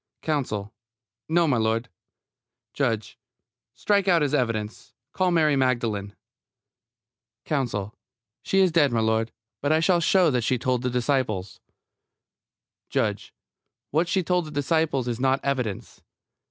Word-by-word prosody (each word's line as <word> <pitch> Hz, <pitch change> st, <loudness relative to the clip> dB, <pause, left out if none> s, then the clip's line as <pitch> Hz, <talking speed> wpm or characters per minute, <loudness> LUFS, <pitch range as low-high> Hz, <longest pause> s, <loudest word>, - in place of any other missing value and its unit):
COUNSEL: 115 Hz, -9 st, -2 dB, 0.6 s
No, 170 Hz, +1 st, +3 dB
m'lud. 115 Hz, -3 st, +1 dB, 0.9 s
JUDGE: 115 Hz, -6 st, -2 dB, 0.6 s
Strike 200 Hz, -2 st, +1 dB
out 170 Hz, -4 st, +4 dB
his 145 Hz, -1 st, -1 dB
evidence. 115 Hz, -6 st, -2 dB, 0.2 s
Call 185 Hz, -1 st, +1 dB
Mary 155 Hz, -4 st, +3 dB
Magdalene. 115 Hz, -6 st, -1 dB, 1.3 s
COUNSEL: 110 Hz, -8 st, -2 dB, 0.5 s
She 195 Hz, -, +2 dB
is 185 Hz, -2 st, +4 dB
dead, 155 Hz, -3 st, +4 dB
m'lud. 110 Hz, 0 st, +1 dB, 0.3 s
But 145 Hz, -, 0 dB
I 155 Hz, -, +4 dB
shall 175 Hz, +2 st, +3 dB
show 170 Hz, -1 st, +3 dB
that 125 Hz, -2 st, +1 dB
she 125 Hz, +3 st, +1 dB
told 125 Hz, 0 st, 0 dB
the 125 Hz, -, -1 dB
disciples 120 Hz, -7 st, -1 dB, 1.3 s
JUDGE: -, -, -1 dB, 0.6 s
What 160 Hz, +4 st, +1 dB
she 190 Hz, +1 st, +1 dB
told 180 Hz, 0 st, 0 dB
the -, -, -8 dB
disciples 145 Hz, -2 st, 0 dB
is 120 Hz, -1 st, -2 dB
not 135 Hz, +1 st, +2 dB
evidence. 125 Hz, -8 st, -3 dB
135 Hz, 125 wpm, -25 LUFS, 115-160 Hz, 1.3 s, out